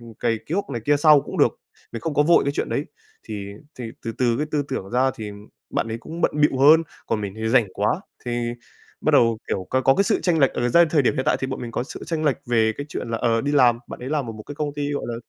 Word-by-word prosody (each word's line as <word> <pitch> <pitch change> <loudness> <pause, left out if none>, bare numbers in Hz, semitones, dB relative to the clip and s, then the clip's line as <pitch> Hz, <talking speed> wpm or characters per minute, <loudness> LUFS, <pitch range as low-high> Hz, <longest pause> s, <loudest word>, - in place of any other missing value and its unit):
ừm, 115 -1 -12
cày 115 +1 -1
cuốc 185 0 -2
này 120 -4 -3
kia 145 0 +3
sau 150 0 +6
cũng - - -7
được, - - +2 0.3
mình 115 - -5
không 155 +5 -3
có 145 - +4
vội 170 +3 +4
cái 140 - 0
chuyện - - -2
đấy. 145 - -1 0.4
Thì 105 -3 -6 0.3
thì 125 - -5 0.2
từ 115 - -3
từ 120 -2 +2
cái 150 - -1
tư 150 -2 0
tưởng 95 - -4
ra 130 +2 +2
thì 105 -2 -6 0.4
bạn - - -1
ấy 115 +1 -4
cũng 165 +7 -8
bận - - +2
bịu 145 -3 +3
hơn, 155 +4 +7 0.2
còn 110 - -1
mình 100 -1 -5
thì 110 0 -2
rảnh 115 -3 +4
quá, - - 0 0.2
thì 120 - -3 0.7
bắt - - +1
đầu, 115 -2 +4
kiểu, 95 -1 -2
có 130 - +2
có 135 0 +4
cái 200 - +2
sự 220 - +1
chênh 175 -3 +2
lệch. 135 -3 +4
Ờ, 120 0 0
ra 170 +7 +6
thời 150 -3 +3
điểm 130 - +2
hiện 130 - -1
tại - - +3
thì 130 - -1
bọn 135 0 -5
mình 120 - -5
có - - -1
sự 130 - -8
chênh 160 -2 -2
lệch 140 -5 +2
về 110 -2 +2
cái 145 - -5
chuyện 125 - -5
là, 115 - -1
ờ, 115 -1 +1
đi 145 +4 -2
làm, 125 -5 +5
bạn - - -8
ấy 125 - -5
làm 145 -4 -1
ở 115 - -5
một 110 0 -10
cái 145 - -9
công 150 -1 -3
ty, 145 0 -2
gọi 140 - -3
là 120 - -3
130 Hz, 295 wpm, -23 LUFS, 115-145 Hz, 0.7 s, hơn